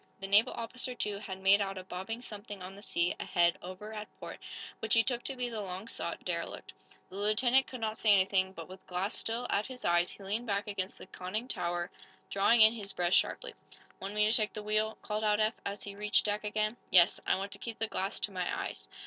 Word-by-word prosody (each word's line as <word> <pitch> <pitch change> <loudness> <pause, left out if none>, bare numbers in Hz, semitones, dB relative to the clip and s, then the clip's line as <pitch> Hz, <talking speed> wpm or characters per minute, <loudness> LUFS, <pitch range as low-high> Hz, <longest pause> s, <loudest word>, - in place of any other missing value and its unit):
The 195 - -5
naval 205 +3 +5
officer, 245 +2 -3
too, 205 -4 -1
had 190 -2 -6
made 200 +2 +7
out 195 -1 -2
a 185 - -5
bobbing 190 +6 -5
something 205 -3 -7
on 190 +1 -8
the 200 - -12
sea, 175 -4 +1
ahead, 170 -1 +2
over 185 +4 -8
at 210 0 -5
port, - - -8 0.4
which 220 0 +1
he 225 - +6
took 245 -1 -1
to 270 - -2
be 250 -1 -1
the 225 -3 -4
long 190 +2 -6
sought - - -4
derelict. - - -4 0.4
The 190 - -8
lieutenant 240 +6 +3
could 255 -3 -8
not 220 0 -2
say 215 - +5
anything, 190 -1 +4
but, 165 -3 -8
with 185 0 -12
glass 185 +3 -2
still 230 +2 -2
at 205 - +1
his 255 -1 -7
eyes, 175 0 +3
he 200 - -9
leaned 215 +5 -2
back 200 -1 0
against 195 -2 -3
the - - -10
conning 190 +6 -4
tower, 175 -6 -1 0.4
drawing 220 +4 +5
in 220 +1 +8
his 205 -4 -5
breath 175 0 0
sharply. - - +2 0.5
"Want 195 +2 -5
me 210 0 +4
to 220 - +4
take 215 -2 +2
the 210 - -5
wheel?" 215 +1 +1
called 215 0 -2
out 210 0 +3
Eph, 215 +1 +1
as 200 0 -4
he 200 - -6
reached 210 +1 +3
deck 210 0 0
again. 215 +2 0
"Yes. 175 -2 +6
I - - +4
want 195 +1 -4
to 200 - -9
keep 225 +4 -6
the 225 - +1
glass 200 -1 -2
to 210 - -1
my 180 -2 -2
eyes." - - -6
205 Hz, 235 wpm, -32 LUFS, 190-220 Hz, 0.5 s, in